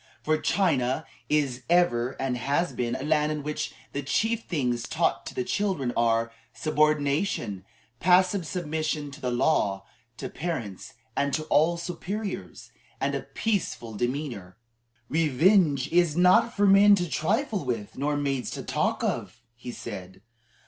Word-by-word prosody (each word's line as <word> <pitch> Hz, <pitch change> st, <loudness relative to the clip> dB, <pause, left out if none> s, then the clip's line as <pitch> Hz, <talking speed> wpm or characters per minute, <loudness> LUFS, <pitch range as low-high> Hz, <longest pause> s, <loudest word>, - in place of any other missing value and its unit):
For 155 Hz, 0 st, +1 dB
China 155 Hz, -7 st, +1 dB, 0.2 s
is 145 Hz, -5 st, +1 dB
and 175 Hz, +1 st, +7 dB
ever 120 Hz, -7 st, 0 dB
has 135 Hz, +6 st, 0 dB
been 120 Hz, 0 st, -2 dB
a 130 Hz, -, -4 dB
land 150 Hz, 0 st, +2 dB
in 150 Hz, -1 st, -3 dB
which 150 Hz, +1 st, -3 dB, 0.2 s
the 140 Hz, -, -2 dB
chief 220 Hz, +11 st, 0 dB
things 125 Hz, -8 st, -1 dB
taught -, -, 0 dB
the -, -, -3 dB
children 160 Hz, -9 st, -1 dB
are, 115 Hz, 0 st, +2 dB, 0.2 s
"subordination, 145 Hz, -, 0 dB, 0.3 s
passive 185 Hz, 0 st, +3 dB
submission 155 Hz, -4 st, -2 dB
to 140 Hz, -, -12 dB
the 125 Hz, -, -1 dB
law, 115 Hz, -7 st, +1 dB, 0.3 s
to -, -, -5 dB
parents, 130 Hz, -, -5 dB, 0.2 s
and 140 Hz, 0 st, +1 dB
to 155 Hz, -, -2 dB
all 165 Hz, +3 st, +4 dB
superiors, 190 Hz, +4 st, -5 dB, 0.3 s
and -, -, 0 dB
a -, -, -1 dB
peaceful 195 Hz, -, -2 dB
demeanor." 120 Hz, -6 st, -3 dB, 0.5 s
"Revenge 155 Hz, -1 st, +3 dB
is 170 Hz, -2 st, +2 dB
not 180 Hz, +6 st, +5 dB
for 205 Hz, -, +4 dB
men 200 Hz, +1 st, +7 dB
to 175 Hz, -2 st, -1 dB
trifle 205 Hz, -, 0 dB
with, 115 Hz, -6 st, -3 dB
nor 145 Hz, +2 st, -1 dB
maids 140 Hz, -3 st, -1 dB
to -, -, -5 dB
talk -, -, -1 dB
of," 120 Hz, -, -3 dB
he 120 Hz, +1 st, -8 dB
said. 95 Hz, -3 st, -8 dB
150 Hz, 140 wpm, -27 LUFS, 125-175 Hz, 0.5 s, and